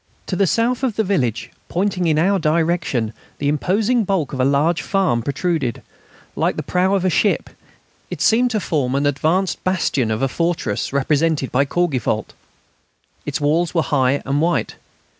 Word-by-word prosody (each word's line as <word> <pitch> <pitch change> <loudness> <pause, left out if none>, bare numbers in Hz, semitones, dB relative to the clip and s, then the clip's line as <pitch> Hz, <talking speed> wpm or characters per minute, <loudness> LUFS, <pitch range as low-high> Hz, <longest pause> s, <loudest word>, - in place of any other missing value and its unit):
To 185 - -3
the 195 +1 +2
south 235 +6 +1
of 255 -6 -1
the 220 - +1
village, 125 - -1 0.2
pointing 185 -1 0
in 155 -2 +2
our 190 +5 +2
direction, 160 -8 0 0.2
the 145 - -2
imposing 205 - +1
bulk 180 -8 -1
of 135 - -4
a - - +3
large 145 +5 +2
farm 185 -12 +1
protruded, 140 -1 -2 0.5
like - - 0
the - - -3
prow 185 +2 +1
of 190 -1 0
a - - +3
ship. 205 - +1 0.6
It - - -6
seemed 245 +3 +3
to 220 -3 0
form 140 -8 -1
an 140 +1 +1
advanced 160 +7 0
bastion 165 -10 0
of 110 +3 -1
a - - +3
fortress, 165 -8 -2
represented 145 +1 +1
by 135 +3 +2
Courgivault. 135 -10 -1 0.9
Its 145 - -2
walls 160 +4 +1
were 165 - +3
high 135 -1 +1
and 140 +2 0
white. 160 -8 0
160 Hz, 170 wpm, -20 LUFS, 140-185 Hz, 0.9 s, a